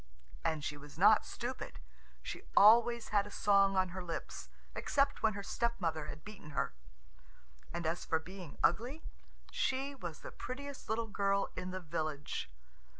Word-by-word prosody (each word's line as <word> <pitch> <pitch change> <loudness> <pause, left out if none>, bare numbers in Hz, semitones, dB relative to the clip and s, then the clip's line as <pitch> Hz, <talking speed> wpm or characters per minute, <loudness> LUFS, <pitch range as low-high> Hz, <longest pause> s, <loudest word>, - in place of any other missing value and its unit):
And 155 -2 0
she 145 - -3
was 145 0 -12
not - - +6
stupid. - - -5 0.4
She - - -5 0.2
always 235 +3 +7
had 205 -1 +2
a - - -8
song 200 -1 +4
on 185 -1 +3
her 185 +1 -5
lips, 170 -2 -5 0.3
except 280 0 +1
when 220 -1 +3
her 200 0 -5
stepmother 180 -9 -1
had 150 +1 -8
beaten 190 -9 -10
her. - - +1 1.0
And 170 -1 -3
as 165 +2 0
for 160 - +2
being 175 0 -9
ugly, 245 - +2 0.5
she 270 +2 0
was 175 - -7
the - - -7
prettiest 280 +2 -7
little 225 +1 +1
girl 200 -2 +1
in 185 0 -4
the 185 0 -3
village. 155 - -3
195 Hz, 155 wpm, -35 LUFS, 160-230 Hz, 1.0 s, always